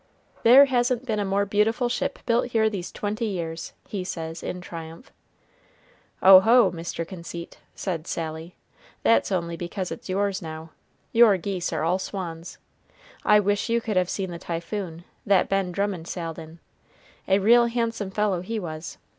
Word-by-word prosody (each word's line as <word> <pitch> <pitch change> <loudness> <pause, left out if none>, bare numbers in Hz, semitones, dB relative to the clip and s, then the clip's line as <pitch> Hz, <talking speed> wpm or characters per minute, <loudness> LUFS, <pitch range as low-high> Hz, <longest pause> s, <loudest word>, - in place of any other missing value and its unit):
"There 255 +5 +8
hasn't 250 -1 0
been 220 -4 -1
a 205 - 0
more 200 +1 +1
beautiful 215 +5 +1
ship 275 +3 -2
built 235 0 +2
here 220 -1 +3
these 185 -4 -5
twenty 215 +2 -3
years," 170 -5 -4
he 195 -3 -4
says, 165 -3 -5
in 180 - -5
triumph. 165 - -9 1.1
"Oho, 195 +3 +8
Mr. 165 -1 -5
Conceit," 170 -2 -8 0.2
said 170 -3 -4
Sally, 160 +1 -5 0.5
"that's 230 - +3
only 170 -2 -1
because 180 +2 -5
it's - - -8
yours 200 +1 0
now 160 -1 -8 0.4
your 230 -4 +6
geese 180 0 -3
are 160 -2 -2
all 175 +3 +1
swans. 175 -3 -6 0.7
I 210 0 +6
wish 205 +2 0
you 235 0 +2
could 225 -3 -3
have 180 -1 +2
seen 190 -2 -3
the 170 - -7
Typhoon, 170 0 -5 0.2
that 195 -2 +3
Ben 195 -2 0
Drummond 190 -3 -2
sailed 165 -3 -5
in 160 +1 -11 0.7
a 195 - +4
real 235 +4 +5
handsome 230 -3 -2
fellow 195 -2 0
he 225 +5 -4
was. 160 -3 -7
190 Hz, 160 wpm, -25 LUFS, 170-215 Hz, 1.1 s, There